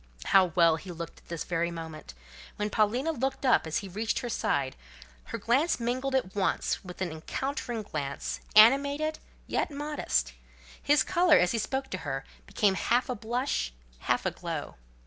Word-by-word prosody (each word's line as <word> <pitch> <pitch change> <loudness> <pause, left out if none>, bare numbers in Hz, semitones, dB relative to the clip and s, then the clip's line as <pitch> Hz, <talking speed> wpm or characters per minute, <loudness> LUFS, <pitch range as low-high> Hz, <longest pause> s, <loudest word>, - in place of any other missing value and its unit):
How 190 -1 +6
well 165 -2 +5
he 180 +2 -9
looked 170 -1 -7
at - - -27
this 170 -2 -4
very 170 0 -1
moment! 160 - -8 0.4
When 210 0 -2
Paulina 235 +9 +2
looked 270 -1 -2
up 250 -9 +4
as 160 - -1
he - - -6
reached 215 +5 -2
her 245 - -3
side, 140 - 0 0.5
her - - -5
glance 270 +8 +2
mingled 255 +3 -1
at 220 -8 0
once 200 -2 0
with 185 0 -5
an 175 - -3
encountering 240 - -4
glance, 140 -7 -4 0.2
animated, 280 +7 +5 0.3
yet - - -1
modest; 280 - -1 0.5
his 290 -2 +4
colour, 345 -3 +4
as 180 - +3
he 230 - 0
spoke 265 +4 -2
to 185 - -3
her, 135 -4 -4 0.2
became 205 -2 +2
half 240 +6 +1
a 250 - -1
blush, 235 - -2 0.3
half - - 0
a - - +1
glow. - - -5
215 Hz, 170 wpm, -29 LUFS, 170-265 Hz, 0.5 s, How